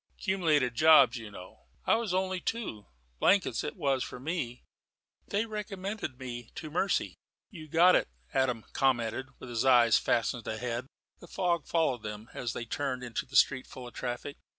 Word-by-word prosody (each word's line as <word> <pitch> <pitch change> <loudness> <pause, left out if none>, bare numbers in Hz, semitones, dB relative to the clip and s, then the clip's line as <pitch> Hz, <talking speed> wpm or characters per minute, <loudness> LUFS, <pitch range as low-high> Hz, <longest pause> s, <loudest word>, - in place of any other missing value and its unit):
"'Cumulated 160 - +1
jobs, 140 -2 +7
you 115 -2 -8
know." 90 -2 -13 0.2
"I - - +4
was 225 -4 0
only 185 0 0
two. 140 - -4 0.3
Blankets 195 -1 +3
it - - -4
was 140 -7 0
with 125 - -8
me. 140 -7 -3 0.6
They 205 +3 0
recommended 205 - -5
me 120 -3 -7
to 155 -2 -7
mercy." 185 +4 0 0.3
"You 160 -6 -10
got 175 +4 +6
it," - - +2 0.3
Adam 125 -4 +1
commented, 125 -1 +1
with 130 - -10
his 115 -2 -1
eyes 120 -4 +6
fastened 115 0 0
ahead. 120 +2 -3 0.3
The 175 - -13
fog 170 -3 -1
followed 155 -8 +1
them 105 +2 -7
as 120 -3 -3
they 115 - -5
turned 130 +1 -3
into 120 0 -4
a - - -8
street 130 -2 +4
full 125 -1 -9
of 120 - -12
traffic. 125 +3 -5
130 Hz, 170 wpm, -30 LUFS, 120-175 Hz, 0.6 s, jobs